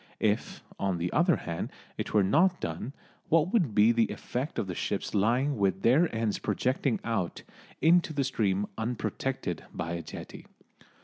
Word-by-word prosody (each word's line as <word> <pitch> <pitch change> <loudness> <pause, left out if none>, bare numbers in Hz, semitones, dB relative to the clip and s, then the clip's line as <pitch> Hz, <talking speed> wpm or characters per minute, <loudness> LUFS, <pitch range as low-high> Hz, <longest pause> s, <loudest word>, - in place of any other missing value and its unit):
If, 105 0 0 0.2
on 95 -2 0
the 85 +1 -2
other 170 +1 +4
hand, 85 -1 -4 0.3
it - - -4
were 105 -2 +4
not 175 - +3
done, 85 +10 -4 0.4
what 165 +2 +3
would 170 - +2
be 110 +2 +6
the 115 -1 +3
effect 130 +5 -4
of - - 0
the 95 - -4
ships - - -3
lying 120 +6 +2
with 95 -1 +1
their 145 +9 +5
ends 110 -2 0
projecting 130 0 0
out 110 -7 -2 0.4
into 170 +1 +5
the 140 -2 0
stream 100 -5 0
unprotected 115 +1 -2
by 85 0 -4
a 85 0 -3
jetty. - - -9
115 Hz, 165 wpm, -29 LUFS, 95-145 Hz, 0.4 s, be